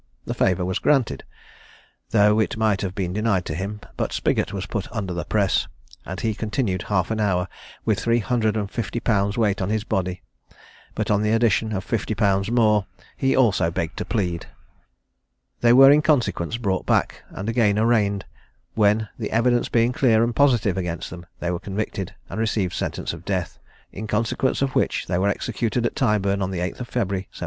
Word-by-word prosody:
The - - -3
favour 90 -1 +1
was 95 0 -1
granted, 125 - +1 0.9
though 105 0 +4
it 110 - 0
might 110 -3 +1
have 95 -1 -3
been 90 -2 -2
denied 105 -3 +1
to - - -3
him; 100 +5 -4 0.2
but - - -1
Spiggot - - 0
was 100 -1 -4
put 105 -4 -4
under 100 -5 -3
the 85 - -4
press, 100 -3 +1 0.4
and 95 +2 -5
he 110 -2 0
continued 105 -3 -2
half 95 -1 -1
an 110 - -1
hour, 95 -4 +1 0.4
with 110 -4 +1
three 115 +4 +2
hundred 110 -2 0
and 100 -2 -3
fifty 115 0 -3
pounds' 100 -3 +1
weight 105 -4 +1
on 95 - -1
his 110 0 0
body; 95 -5 -2 0.7
but, - - -1
on 105 0 +3
the 105 0 +1
addition 115 -1 +2
of 95 -3 -2
fifty 110 0 -2
pounds 100 -1 +1
more, 110 -4 +3 0.3
he 135 0 +1
also 100 -10 +3
begged 80 -1 -3
to - - -2
plead. 90 -7 -2 1.1
They 120 - +4
were 135 +3 +9
in 150 +1 +5
consequence 120 - +1
brought 95 -6 -2
back, - - +1
and 95 - -6
again 115 -3 +2
arraigned; 105 -3 +2 0.5
when, 105 0 +2
the 110 - -3
evidence 120 +1 +2
being 115 +1 +2
clear 120 -6 +3
and 115 0 -1
positive 120 -9 +3
against 90 -2 -4
them, 85 -1 -9
they 85 - -1
were 85 - -2
convicted, 100 -1 -4
and - - -6
received 105 -5 0
sentence - - -3
of - - -9
death; - - -3 0.3
in 110 +3 -6
consequence 115 +5 0
of 135 -1 -1
which - - 0
they 90 - -1
were 100 +2 +2
executed 115 +3 -1
at - - -1
Tyburn 100 -5 +1
on 95 - -1
the 95 - -4
8th 90 +2 -3
of 125 - -5
February, 100 -6 -2
1721. - - -25
105 Hz, 195 wpm, -23 LUFS, 95-115 Hz, 1.1 s, were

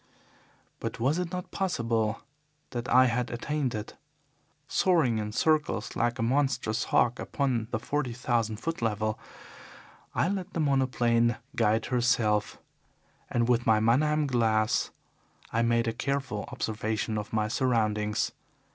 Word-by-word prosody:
But - - -5
was 140 +8 +1
it 180 -2 -3
not 180 -1 -5
possible 115 - -1 0.5
that 120 -1 -4
I 130 +1 +6
had 120 0 0
attained 135 +2 -2
it? 105 0 -6 0.7
Soaring 155 -12 +2
in 105 0 -3
circles 150 -4 +1
like 120 +1 0
a 115 - -1
monstrous 125 -3 +1
hawk 120 0 +2
upon 125 -6 -1
the 120 - -1
forty 135 +3 -2
thousand 115 -2 0
foot 165 +6 -4
level 110 -1 -1 1.0
I - - +2
let 190 -1 -3
the - - -2
monoplane 120 -5 +2 0.2
guide 110 0 +2
herself, 120 -4 +2 0.7
and 120 -1 +1
with 120 -1 +2
my 110 -1 +5
Mannheim 150 +7 +3
glass 110 -4 +1 0.6
I 115 - +2
made 115 0 +2
a 115 - 0
careful 130 -4 -2
observation 110 -2 -2
of 105 - -7
my 110 -1 +1
surroundings. 110 -3 0
120 Hz, 135 wpm, -28 LUFS, 110-135 Hz, 1.0 s, I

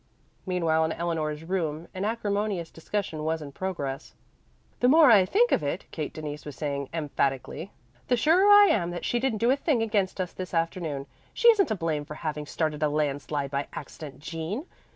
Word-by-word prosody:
Meanwhile 165 -3 +2
in 160 - -1
Eleanor's 160 -3 -2
room 165 -3 -2
an 185 +2 -3
acrimonious 205 -5 -1
discussion 165 -2 -4
was 160 +1 0
in 145 -2 -8
progress. 145 -5 -4 0.6
"The 245 - +3
more 300 0 +7
I 200 -4 +7
think 470 - +3
of - - +3
it," 145 +5 -3
Kate 155 -3 -4
Denise 150 -1 -6
was 145 -2 -8
saying 140 -2 -3
emphatically, 145 +1 -2 0.4
"the 245 - +3
surer 345 - +4
I 410 0 +9
am 175 -5 +1
that 175 0 -5
she 240 - +1
didn't 255 -3 0
do 235 +4 +3
a - - +4
thing 280 -5 +1
against 205 -4 0
us 180 -2 -2
this 185 -1 -6
afternoon. 165 -4 -1 0.3
She 470 - +6
isn't 410 -4 +2
to 220 - -1
blame 160 -5 -2
for 150 - -8
having 150 -2 -4
started 155 -1 -2
a 150 - +3
landslide 145 -1 -1
by 140 0 -2
accident, 145 -3 -9
Jean. 165 - -4
165 Hz, 190 wpm, -27 LUFS, 150-210 Hz, 0.6 s, I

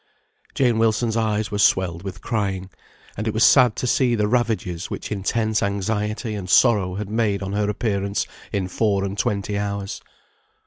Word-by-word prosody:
Jane 120 -4 +2
Wilson's 115 0 +1
eyes 110 -2 0
were 105 - -2
swelled 90 -4 +2
with 95 0 -7
crying; 95 -4 -2 0.4
and 105 +2 -4
it 110 - -2
was 110 - +3
sad 125 -5 +6
to - - -3
see 125 -1 +2
the 105 -2 +1
ravages 110 -7 -1
which - - -6
intense 110 +2 0
anxiety 105 +3 -2
and 95 -3 -5
sorrow 100 -4 +4
had 105 0 -4
made 105 -2 0
on 95 0 -4
her 105 0 0
appearance 100 -2 -1 0.3
in 95 -2 -1
four 100 0 0
and 100 0 -3
twenty 100 0 -1
hours. 100 -1 -4
105 Hz, 170 wpm, -22 LUFS, 100-110 Hz, 0.4 s, sad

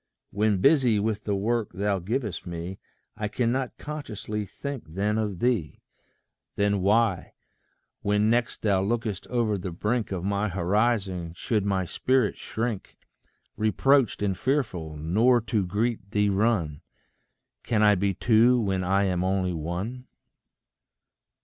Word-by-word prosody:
When 105 -2 +1
busy 130 -6 +4
with 105 0 -2
the 100 - 0
work 110 +2 -1
thou 100 +1 0
givest 105 +2 -3
me, 85 +2 -6 0.4
I 105 - -2
cannot 120 +4 -1
consciously 110 -8 -5
think 140 +4 -6
then 105 +3 +1
of 105 -4 -2
thee. 115 -7 -1 0.7
Then 100 -1 +1
why, 100 -1 +1 0.7
when 105 +1 +2
next 120 +1 0
thou 100 -3 +3
lookest 110 -1 -2
o'er 115 -5 0
the 90 - -4
brink 105 +7 -1
Of 90 -3 -3
my 100 +2 0
horizon, 95 -2 0
should 105 +1 -1
my 95 -2 +1
spirit 130 +5 +1
shrink, 110 -3 -4 0.6
Reproached 115 +3 +2
and 95 -2 +1
fearful, 95 - -1
nor 110 +11 +3
to 110 -4 -1
greet 105 +1 -1
thee 105 0 +2
run? 95 -8 +1 0.8
Can 110 -2 +1
I 105 -1 +6
be 100 0 0
two 120 +4 +4
when 95 -4 0
I 95 +2 +2
am 90 -2 0
only 95 -1 0
one. 90 +11 -4
105 Hz, 135 wpm, -26 LUFS, 95-115 Hz, 0.8 s, I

